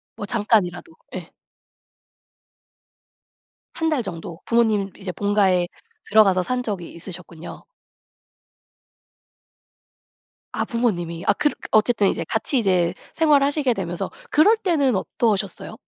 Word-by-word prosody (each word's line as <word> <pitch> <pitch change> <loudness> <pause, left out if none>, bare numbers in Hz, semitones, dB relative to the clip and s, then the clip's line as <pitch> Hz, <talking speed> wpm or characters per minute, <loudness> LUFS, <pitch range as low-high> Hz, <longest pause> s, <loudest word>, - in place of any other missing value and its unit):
뭐 205 - -6
잠깐이라도 210 - 0 0.2
예. - - -7 2.4
1 325 0 -1
달 295 -6 0
정도 170 -3 -7
부모님 220 -4 +2
이제 190 -2 -5
본가에 190 -2 +2 0.4
들어가서 195 -4 +5
산 250 +5 -2
적이 195 -7 -5
있으셨군요. 170 -1 -9 2.9
아 - - -1
부모님이. 175 -8 -2
아 - - +5
그렇 295 +6 0 0.2
어쨌든 215 -1 +3
이제 165 - -2
같이 225 - -1
이제 185 -7 +2 0.2
생활을 295 -4 +4
하시게 280 -3 +1
되면서 175 -4 -4 0.2
그럴 410 +10 +5
때는 315 - +1
어떠셨어요? 205 +2 -2
205 Hz, 245 characters per minute, -22 LUFS, 180-250 Hz, 2.9 s, 들어가서